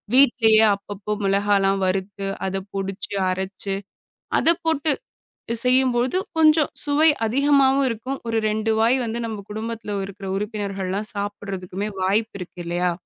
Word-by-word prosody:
வீட்டிலேயே 230 Hz, -5 st, +5 dB
அப்பப்போ 200 Hz, +1 st, -7 dB
மிளகாலாம் 195 Hz, 0 st, +2 dB
வறுத்து, 195 Hz, +1 st, -2 dB, 0.2 s
அத 195 Hz, 0 st, -2 dB
பொடிச்சு 195 Hz, +1 st, -4 dB, 0.2 s
அரச்சு, 190 Hz, +1 st, -3 dB, 0.7 s
அதப் 335 Hz, +1 st, +2 dB
போட்டு 315 Hz, -1 st, +2 dB, 0.7 s
செய்யும்போது 255 Hz, +3 st, +3 dB, 0.2 s
கொஞ்சம் 310 Hz, -1 st, +5 dB
சுவை 300 Hz, +2 st, +4 dB, 0.2 s
அதிகமாவும் 275 Hz, +2 st, +3 dB
இருக்கும். 250 Hz, +4 st, -4 dB
ஒரு 225 Hz, -1 st, 0 dB
2 220 Hz, +1 st, 0 dB
வாய் 235 Hz, +4 st, +4 dB
வந்து 230 Hz, +1 st, -3 dB
நம்ம 215 Hz, -3 st, -6 dB
குடும்பத்துல 220 Hz, -1 st, -4 dB
இருக்கிற 195 Hz, 0 st, -9 dB
உறுப்பினர்கள்லாம் 200 Hz, -1 st, -3 dB
சாப்பிடுறதுக்குமே 200 Hz, -1 st, -4 dB, 0.2 s
வாய்ப்பு 205 Hz, +3 st, 0 dB
இருக்கு 180 Hz, 0 st, -9 dB
இல்லையா? 175 Hz, +1 st, 0 dB
210 Hz, 120 wpm, -23 LUFS, 195-250 Hz, 0.7 s, வீட்டிலேயே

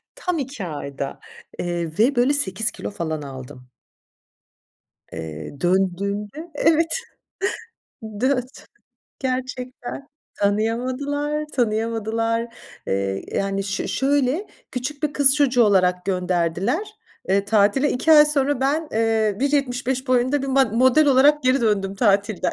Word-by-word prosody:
Tam 360 Hz, -9 st, -2 dB
2 265 Hz, -7 st, -5 dB
ayda, 140 Hz, -3 st, -5 dB, 0.4 s
eee, 175 Hz, -2 st, -2 dB
ve 245 Hz, +5 st, +3 dB
böyle 245 Hz, +4 st, +3 dB
8 220 Hz, -6 st, 0 dB
kilo -, -, -6 dB
falan 160 Hz, -5 st, -4 dB
aldım. 130 Hz, -2 st, -10 dB, 1.4 s
Eee, 80 Hz, -, -7 dB
döndüğümde, 200 Hz, -, -1 dB
evet, 325 Hz, +2 st, +2 dB, 1.3 s
döt 255 Hz, 0 st, -1 dB, 0.5 s
gerçekten 255 Hz, +1 st, -4 dB, 0.3 s
tanıyamadılar, 255 Hz, +8 st, -1 dB
tanıyamadılar, 230 Hz, 0 st, -1 dB, 0.3 s
eee, 95 Hz, 0 st, -1 dB
yani, 195 Hz, 0 st, -1 dB
ş 200 Hz, -1 st, -3 dB
şöyle, 280 Hz, +6 st, +1 dB, 0.3 s
küçük 285 Hz, +3 st, -5 dB
bir 295 Hz, -, 0 dB
kız 280 Hz, 0 st, +5 dB
çocuğu 260 Hz, -4 st, +3 dB
olarak 180 Hz, -3 st, +2 dB
gönderdiler, 180 Hz, -, 0 dB, 0.4 s
eee, 195 Hz, +1 st, +2 dB
tatile. 215 Hz, +7 st, +3 dB
2 320 Hz, +6 st, +2 dB
ay 300 Hz, -1 st, +9 dB
sonra 285 Hz, -2 st, +1 dB
ben, 295 Hz, +4 st, 0 dB
eee, 220 Hz, -2 st, +1 dB
1.75 265 Hz, -2 st, 0 dB
boyunda 255 Hz, +3 st, +2 dB
bir -, -, -3 dB
ma 270 Hz, 0 st, +4 dB
model 260 Hz, +6 st, +3 dB
olarak 285 Hz, +2 st, +5 dB
geri 255 Hz, +1 st, +3 dB
döndüm 200 Hz, -4 st, 0 dB
tatilden. 200 Hz, -1 st, +1 dB
240 Hz, 115 wpm, -22 LUFS, 195-275 Hz, 1.4 s, ay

